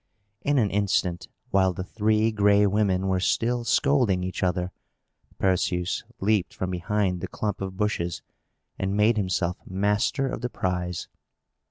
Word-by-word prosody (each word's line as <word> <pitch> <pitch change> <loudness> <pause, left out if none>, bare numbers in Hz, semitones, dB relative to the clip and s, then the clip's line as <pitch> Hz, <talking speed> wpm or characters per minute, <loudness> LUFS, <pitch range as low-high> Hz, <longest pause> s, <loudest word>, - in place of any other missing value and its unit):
In 145 0 +1
an 110 -6 +2
instant, 90 -3 0 0.2
while 95 -1 +3
the 90 - -4
Three 110 +3 +1
Gray 105 -1 +4
Women 100 -2 +1
were 95 -1 +1
still 120 +5 +1
scolding 115 -6 +2
each 90 0 -4
other, 90 0 0 0.7
Perseus 90 -1 0 0.2
leaped 100 -2 +1
from 95 0 -3
behind 90 0 -1
the - - -3
clump 105 -3 -3
of 95 -1 -5
bushes, 90 -5 -1 0.6
and 95 +1 -1
made 110 +2 +4
himself 90 -2 0
master 105 +8 0
of 125 - -4
the 125 - -2
prize. 90 -4 -2
95 Hz, 145 wpm, -26 LUFS, 90-105 Hz, 0.7 s, Gray